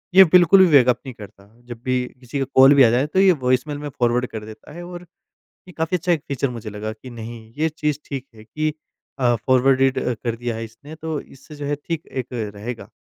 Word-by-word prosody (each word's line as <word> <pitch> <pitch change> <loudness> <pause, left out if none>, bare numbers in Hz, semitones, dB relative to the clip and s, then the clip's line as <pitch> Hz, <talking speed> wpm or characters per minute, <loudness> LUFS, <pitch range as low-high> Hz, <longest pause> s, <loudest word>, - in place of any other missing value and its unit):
ये 190 - +11
बिल्कुल 180 +2 +7
भी - - +3
वेकअप 125 -4 +5
नहीं 130 - -7
करता। 100 -2 -14 0.2
जब 120 -1 -9
भी 125 -1 0
किसी 130 +2 -5
का 135 - 0
कॉल 135 +2 +8
भी 135 - +7
आ 115 - +6
जाए 130 +5 +1
तो 190 - 0
ये 190 -1 +6
वॉइसमेल 135 +4 +1
में 145 0 -6
फ़ॉरवर्ड 120 -1 0
कर 110 -1 -7
देता 110 0 -12
है 175 +1 -8
और 175 0 -9 0.6
ये - - -11
काफ़ी 160 +3 0
अच्छा 175 +1 -1
एक 160 -4 +1
फ़ीचर 140 -1 -1
मुझे 115 -3 -7
लगा 105 +1 -5
कि 110 +4 -11
नहीं 115 0 -8 0.2
ये 160 +1 +1
चीज़ 150 -2 -2
ठीक 135 -2 -6
है 110 - -14
कि 155 +6 -2 0.5
अ, 120 -2 +3
फ़ॉरवर्डेड 130 +3 +2
अ 125 - -1
कर 115 -1 -1
दिया 120 -1 -4
है 115 - -5
इसने 140 +8 -13
तो 160 -1 -4
इससे 150 +3 -15
जो 145 -1 -6
है 145 - -1
ठीक 165 -2 -3
एक 130 -2 -5
रहेगा। 110 +1 -6
130 Hz, 235 wpm, -21 LUFS, 115-150 Hz, 0.6 s, ये